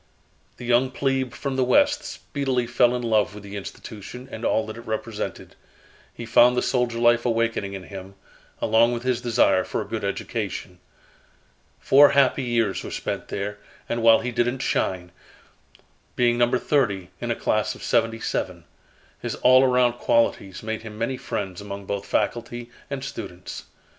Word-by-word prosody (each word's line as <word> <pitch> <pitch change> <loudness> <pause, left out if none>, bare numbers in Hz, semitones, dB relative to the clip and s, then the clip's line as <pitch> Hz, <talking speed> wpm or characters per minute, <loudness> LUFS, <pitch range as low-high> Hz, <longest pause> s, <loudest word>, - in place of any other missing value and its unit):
The 125 - -8
young 125 +2 +3
plebe 135 -1 -1
from 135 +1 -4
the 130 - +3
West 290 - +3
speedily 135 -4 -2
fell 120 +1 +3
in 125 - -3
love 110 -4 +1
with 105 - -10
the 100 0 -8
institution 105 +5 -8
and 110 - -7
all 110 - +1
that 110 - -7
it 115 - -9
represented. 110 0 -4 0.6
He 120 - -8
found 120 +2 +5
the - - +2
soldier 125 -2 0
life 120 0 +4
awakening 115 -4 0
in 95 -1 -6
him, 95 0 -9 0.5
along 115 +2 +4
with 120 0 -4
his 125 -2 0
desire 115 -6 +3
for - - -3
a - - -3
good - - -4
education. 90 -1 -4 1.0
Four 140 +1 +7
happy 140 -1 +4
years 115 -5 0
were - - -6
spent - - -4
there 105 +1 -4 0.3
and 120 - -2
while 115 0 +6
he 125 +2 -3
didn't 120 +2 0
shine, 90 -1 -1 1.0
being 120 -1 +3
number 120 +1 +3
thirty 100 -11 0
in - - -3
a - - +1
class - - 0
of - - -12
seventy 115 0 +1
seven, - - -3 0.6
his - - -4
all 130 +1 +6
around 125 -2 +3
qualities 100 -5 +1
made 110 0 -3
him 110 -1 -9
many 115 +4 -1
friends 100 -7 -4
among 100 -1 -7
both 100 0 -4
faculty 120 0 -2 0.2
and 140 -1 -4
students. 95 -9 -7
120 Hz, 170 wpm, -24 LUFS, 105-125 Hz, 1.0 s, Four